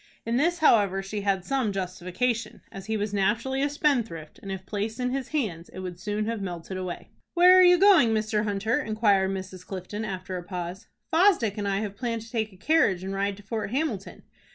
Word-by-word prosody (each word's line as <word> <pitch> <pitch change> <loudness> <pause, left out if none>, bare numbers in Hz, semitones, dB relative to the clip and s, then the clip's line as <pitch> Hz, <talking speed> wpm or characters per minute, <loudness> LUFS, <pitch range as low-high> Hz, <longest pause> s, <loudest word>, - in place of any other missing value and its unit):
In 230 +1 0
this, 340 +6 +2
however, 200 - +4
she 205 +2 -4
had 195 -2 0
some 265 -6 0
justification, 195 +5 -2
as 195 +1 -9
he 220 0 0
was 210 0 -3
naturally 225 +7 0
a 285 - +2
spendthrift, 235 - -1
and, 195 - -7
if 190 -1 -6
placed 215 +4 -3
in 250 0 0
his 265 -1 -2
hands, 205 - -3
it 185 - -8
would 180 -2 -6
soon 210 +3 -2
have 225 -1 -3
melted 180 -1 -5
away. 185 -2 -6 0.2
"Where 360 +1 +8
are - - +8
you 360 -1 +7
going, 365 - +6
Mr. 215 -1 0
Hunter?" 215 +6 0
inquired 210 -5 +2
Mrs. 185 -1 -6
Clifton, 195 +3 -6
after 185 -2 -4
a 175 - -6
pause. 180 +2 -6 0.3
"Fosdick 325 - +4
and 205 -2 -3
I 195 +1 0
have 205 -2 -4
planned 230 -3 -3
to 225 - -14
take 220 -2 -1
a 190 - -17
carriage 205 - +2
and 190 +1 -4
ride 200 0 -1
to 205 - -14
Fort 215 +1 -3
Hamilton." 250 -6 -3
210 Hz, 210 wpm, -26 LUFS, 190-240 Hz, 0.3 s, Where